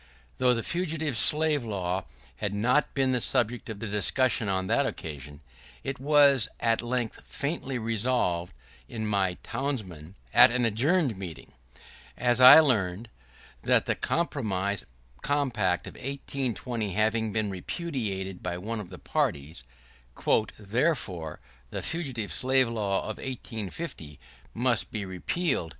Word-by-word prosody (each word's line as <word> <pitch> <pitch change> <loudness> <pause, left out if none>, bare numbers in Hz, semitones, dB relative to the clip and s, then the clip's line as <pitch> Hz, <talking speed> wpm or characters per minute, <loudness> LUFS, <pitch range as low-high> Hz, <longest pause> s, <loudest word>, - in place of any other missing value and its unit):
Though 125 -1 +4
the 115 - -2
Fugitive 160 -5 -2
Slave 150 +4 +3
Law 95 -4 -2 0.3
had 100 +5 -2
not 125 +8 +2
been 135 -2 +2
the 125 -1 +1
subject 120 +1 +1
of 110 - -5
discussion 110 +2 +1
on 95 -1 0
that - - +2
occasion, 75 -1 -7 0.4
it 135 -1 -4
was 140 -3 +5
at 115 -1 +2
length 120 -1 -2
faintly 140 -3 -3
resolved 110 -6 0 0.4
by - - -8
my 100 -4 0
townsmen, 100 - -4 0.2
at 125 +2 +8
an 120 0 +1
adjourned 130 - +1
meeting, 80 -8 -8 0.7
as 125 0 +2
I 130 +5 +12
learn, 110 - 0 0.5
that - - +3
the - - +1
compromise 100 - -1 0.3
compact 120 -11 0
of - - -8
1820 125 -5 -3
having 110 +1 +1
been 105 -1 -1
repudiated 95 - -4
by 85 -1 -3
one 110 +5 -4
of 100 -4 -7
the 90 - -9
parties, 70 -5 -2 0.9
"Therefore,… 105 - -1 0.3
the - - -5
Fugitive 135 -11 -3
Slave 130 0 +3
Law 105 -4 0
of 110 - -5
1850 110 - -6 0.4
must 120 -2 +1
be 105 -3 -4
repealed." 95 - -1
115 Hz, 130 wpm, -28 LUFS, 95-130 Hz, 0.9 s, I